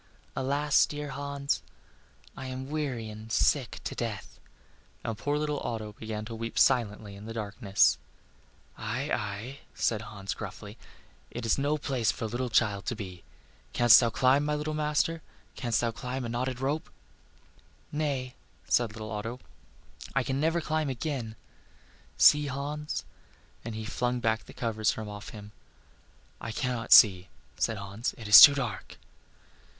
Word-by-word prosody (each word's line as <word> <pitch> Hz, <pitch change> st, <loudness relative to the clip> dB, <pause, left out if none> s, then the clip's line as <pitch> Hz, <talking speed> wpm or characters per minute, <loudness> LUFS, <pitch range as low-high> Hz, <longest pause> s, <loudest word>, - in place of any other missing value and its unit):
Alas, 145 Hz, +2 st, +2 dB
dear 150 Hz, -1 st, -5 dB
Hans! 140 Hz, +1 st, -2 dB, 0.7 s
I 130 Hz, -, -7 dB
am 130 Hz, +2 st, -6 dB
weary 135 Hz, -7 st, -2 dB
and 110 Hz, +1 st, -9 dB
sick 130 Hz, +2 st, +1 dB
to -, -, -4 dB
death." 110 Hz, -5 st, -5 dB, 0.6 s
And 115 Hz, -, -3 dB
poor 145 Hz, +7 st, -1 dB
little 150 Hz, -1 st, -1 dB
Otto 110 Hz, -2 st, -4 dB
began 110 Hz, 0 st, -6 dB
to 115 Hz, -, -7 dB
weep 115 Hz, 0 st, -5 dB
silently 105 Hz, -5 st, +2 dB
in 100 Hz, +1 st, -11 dB
the 115 Hz, -, -7 dB
darkness. 100 Hz, -2 st, +2 dB, 0.8 s
"Aye, -, -, -3 dB
aye," 105 Hz, +7 st, -4 dB, 0.2 s
said 110 Hz, -2 st, 0 dB
Hans, 100 Hz, -3 st, -6 dB
gruffly, -, -, -8 dB, 0.5 s
"it 120 Hz, 0 st, -6 dB
is 115 Hz, -, +2 dB
no 145 Hz, +2 st, +1 dB
place 130 Hz, -6 st, 0 dB
for -, -, -5 dB
a -, -, -1 dB
little 120 Hz, +3 st, -3 dB
child 105 Hz, -4 st, +1 dB
to 120 Hz, -, -1 dB
be. 95 Hz, -4 st, -8 dB, 0.5 s
Canst 120 Hz, -2 st, +8 dB
thou 120 Hz, -, +2 dB
climb, 130 Hz, +4 st, +3 dB
my 150 Hz, 0 st, 0 dB
little 150 Hz, +1 st, -3 dB
master? 150 Hz, +2 st, 0 dB, 0.3 s
canst 120 Hz, -4 st, 0 dB
thou 120 Hz, -1 st, 0 dB
climb 125 Hz, +4 st, -5 dB
a -, -, -4 dB
knotted 125 Hz, +1 st, -2 dB
rope?" 140 Hz, +4 st, -2 dB, 1.0 s
"Nay," 140 Hz, -4 st, -2 dB, 0.3 s
said 110 Hz, -2 st, +1 dB
Otto, 110 Hz, +3 st, -5 dB, 0.8 s
"I 135 Hz, -, +3 dB
can 135 Hz, +1 st, -2 dB
never 165 Hz, +3 st, +1 dB
climb 155 Hz, -1 st, -1 dB
again! 130 Hz, -4 st, -4 dB, 0.8 s
See, 150 Hz, 0 st, +6 dB
Hans;" 145 Hz, +2 st, -4 dB, 0.6 s
and 115 Hz, -1 st, -6 dB
he 110 Hz, 0 st, -5 dB
flung 125 Hz, +2 st, -1 dB
back 110 Hz, -1 st, 0 dB
the -, -, -12 dB
covers 110 Hz, -2 st, -1 dB
from 110 Hz, -1 st, -2 dB
off 105 Hz, 0 st, -8 dB
him. 105 Hz, -1 st, -10 dB, 0.9 s
"I 115 Hz, -, -4 dB
cannot 125 Hz, 0 st, -3 dB
see," 95 Hz, -4 st, +8 dB, 0.3 s
said 110 Hz, -, 0 dB
Hans, 100 Hz, +4 st, -4 dB
"it 115 Hz, -, -8 dB
is 105 Hz, +1 st, +11 dB
too 145 Hz, -1 st, +11 dB
dark." 125 Hz, -7 st, -4 dB
120 Hz, 155 wpm, -29 LUFS, 110-140 Hz, 1.0 s, is